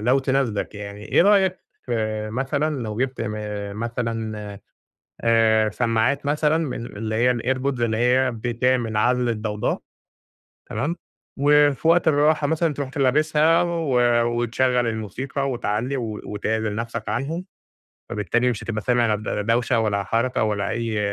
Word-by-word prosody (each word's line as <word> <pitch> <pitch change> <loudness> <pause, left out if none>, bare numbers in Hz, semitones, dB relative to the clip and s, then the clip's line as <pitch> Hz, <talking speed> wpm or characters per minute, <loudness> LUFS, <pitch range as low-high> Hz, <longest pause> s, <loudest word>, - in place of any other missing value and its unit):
لو 125 +5 +3
تناسبك 130 -7 -1
يعني، 105 0 -8
إيه - - +3
رأيك 190 -2 +4 0.2
في 110 -3 -2
مثلًا 140 +3 -1
لو 110 -2 -4
جِبت 130 +2 -2 0.5
مثلًا 115 -1 -3 0.8
آآ 110 -1 +3
سمّاعات 120 +5 0
مثلًا 150 +2 +2
من 135 -7 -3
من - - -5
اللي 110 +1 -3
هي 120 +3 +3
الairpods 130 +2 -1
اللي 115 -2 +1
هي 125 +3 +3
بتعمل 120 0 0
عزْل 125 +3 +2
الضوضاء، 105 -2 -2 0.9
تمام، 155 +5 -2 0.4
و 145 +1 +5
في 150 +5 -4
وقت 170 0 +4
الراحة 150 0 +3
مثلًا 160 +1 +1
ترُوح 140 -1 -4
ت 135 - -9
لابسها 155 +4 +3
و 170 -4 -2 0.5
وتشغّل 125 +1 +1
الموسيقى 130 +6 -3
وتعلّي 120 +3 -2
و 110 -4 -4
وتعزِل 110 +1 -2
نَفْسك 115 -1 -4
عنهم 140 - -2 0.6
فبالتالي 120 +4 0
مش 115 -4 -3
هتبقى 110 -2 -3
سامع 120 -1 +2
ل 105 - -7
لا 105 - -2
دوشة 115 +2 +1
ولا 105 -3 0
حركة 115 +6 0
ولا 105 -2 -1
أي 115 -2 -2
120 Hz, 145 wpm, -23 LUFS, 110-140 Hz, 0.9 s, و